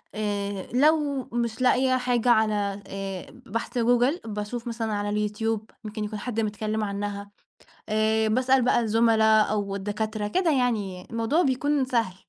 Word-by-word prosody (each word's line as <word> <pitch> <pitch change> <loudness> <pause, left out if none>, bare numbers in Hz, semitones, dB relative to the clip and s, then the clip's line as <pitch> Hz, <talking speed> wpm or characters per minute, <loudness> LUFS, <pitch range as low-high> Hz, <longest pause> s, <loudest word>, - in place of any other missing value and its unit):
آآ، 205 -2 -3
لو 290 0 +3
مش 235 0 -2
لاقية 255 0 +3
حاجة 245 -1 +1
على 210 -3 +2
آآ 195 -1 -7
بحث 230 +3 -4
Google 245 +5 +2
باشوف 215 +3 -5
مثلًا 225 -2 -2
على 205 +1 0
الYoutube 220 +1 -2 0.2
ممكن 215 0 -5
يكون 210 0 -4
حد 230 +1 -3
متكلّم 215 0 -2
عنها 200 0 -4 0.6
آآ، 220 +1 +2
باسأل 255 +3 +3
بقى 245 0 +3
الزُملا 220 -1 +4
أو 205 -2 -1
الدكاترة 210 +1 -3
كده 360 - +1
يعني 215 -9 -1
الموضوع 230 +9 +1
بيكون 280 0 +1
سهل. 230 -7 0
220 Hz, 140 wpm, -26 LUFS, 205-245 Hz, 0.6 s, الزُملا